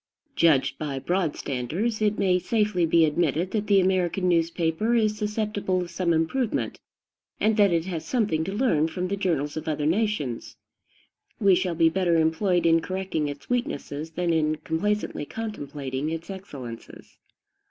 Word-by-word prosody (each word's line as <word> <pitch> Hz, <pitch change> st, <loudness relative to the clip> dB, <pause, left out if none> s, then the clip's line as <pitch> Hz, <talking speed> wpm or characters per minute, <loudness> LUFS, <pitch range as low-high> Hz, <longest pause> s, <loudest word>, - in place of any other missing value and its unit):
Judged 140 Hz, -4 st, +3 dB
by 145 Hz, -3 st, -3 dB
broad 175 Hz, +3 st, -1 dB
standards, 165 Hz, -, -2 dB
it 210 Hz, 0 st, +2 dB
may 185 Hz, -2 st, +2 dB
safely 210 Hz, -4 st, +1 dB
be 165 Hz, 0 st, +5 dB
admitted 170 Hz, +3 st, 0 dB
that 210 Hz, -1 st, -1 dB
the 200 Hz, -1 st, +5 dB
American 185 Hz, 0 st, +1 dB
newspaper 170 Hz, +5 st, +1 dB
is 215 Hz, -2 st, +2 dB
susceptible 210 Hz, -3 st, -1 dB
of 175 Hz, -1 st, -4 dB
some 170 Hz, 0 st, 0 dB
improvement, 170 Hz, +10 st, 0 dB, 0.6 s
and 220 Hz, 0 st, +2 dB
that 205 Hz, -3 st, +4 dB
it 165 Hz, -1 st, +1 dB
has 170 Hz, -4 st, -4 dB
something 210 Hz, -11 st, 0 dB
to 195 Hz, -, -4 dB
learn 200 Hz, -, +2 dB
from 180 Hz, +2 st, -3 dB
the 200 Hz, -, 0 dB
journals 160 Hz, -7 st, -1 dB
of 155 Hz, +1 st, -5 dB
other 150 Hz, -1 st, -1 dB
nations. 165 Hz, -, -1 dB, 0.8 s
We 200 Hz, -3 st, +5 dB
shall 180 Hz, -1 st, +1 dB
be 165 Hz, 0 st, +4 dB
better 175 Hz, 0 st, +1 dB
employed 170 Hz, +3 st, +2 dB
in 165 Hz, 0 st, +5 dB
correcting 185 Hz, -4 st, -2 dB
its 145 Hz, 0 st, -7 dB
weaknesses 160 Hz, -, -3 dB
than 170 Hz, +1 st, -1 dB
in 155 Hz, -1 st, +2 dB
complacently 195 Hz, +3 st, -2 dB
contemplating 145 Hz, -10 st, -4 dB
its 165 Hz, +3 st, -5 dB
excellences. 135 Hz, -, -9 dB
175 Hz, 155 wpm, -25 LUFS, 160-205 Hz, 0.8 s, be